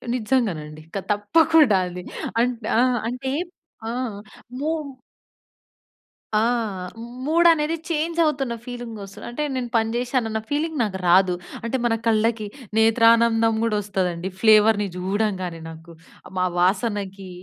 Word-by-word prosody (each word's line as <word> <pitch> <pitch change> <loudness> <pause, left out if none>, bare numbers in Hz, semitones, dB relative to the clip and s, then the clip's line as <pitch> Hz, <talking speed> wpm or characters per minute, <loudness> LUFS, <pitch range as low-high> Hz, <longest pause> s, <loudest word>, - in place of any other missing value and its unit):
నిజంగానండి. 195 -11 -1
క - - 0
తప్పకుండా 275 +3 +4
అండి. 180 0 -6 0.4
అంట్ 240 -1 -1
ఆ! 235 - +5 0.3
అంటే, 260 +2 -4 0.6
ఆ! - - -2 0.7
మూమ్ 305 -1 -2 1.5
ఆ! - - +5 0.9
మూడ్ 335 +3 +4
అనేది 310 0 +1
చేంజ్ 330 +1 -1
అవుతున్న 270 -6 0
ఫీలింగ్ 245 -2 -7
వస్తది. 195 0 -10
అంటే 300 +5 -3
నేను 250 -2 -3
పని 225 -1 +2
చేశాను 245 -1 0
అన్న 220 - -2
ఫీలింగ్ 310 +2 -1
నాకు 200 -3 -2
రాదు. 180 0 +5 0.3
అంటే 235 +3 -1
మన 230 - +2
కళ్ళకి 220 0 +1 0.3
నేత్రానందం 225 0 +4
కూడా 230 -2 +1
వస్తదండి 185 -2 -2
ఫ్లేవర్‌ని 215 -1 +5
చూడంగానే 185 -3 -2
నాకు. 165 +1 -12 0.4
మా 185 - +2
వాసనకి 195 0 0
225 Hz, 120 wpm, -23 LUFS, 195-255 Hz, 1.5 s, ఆ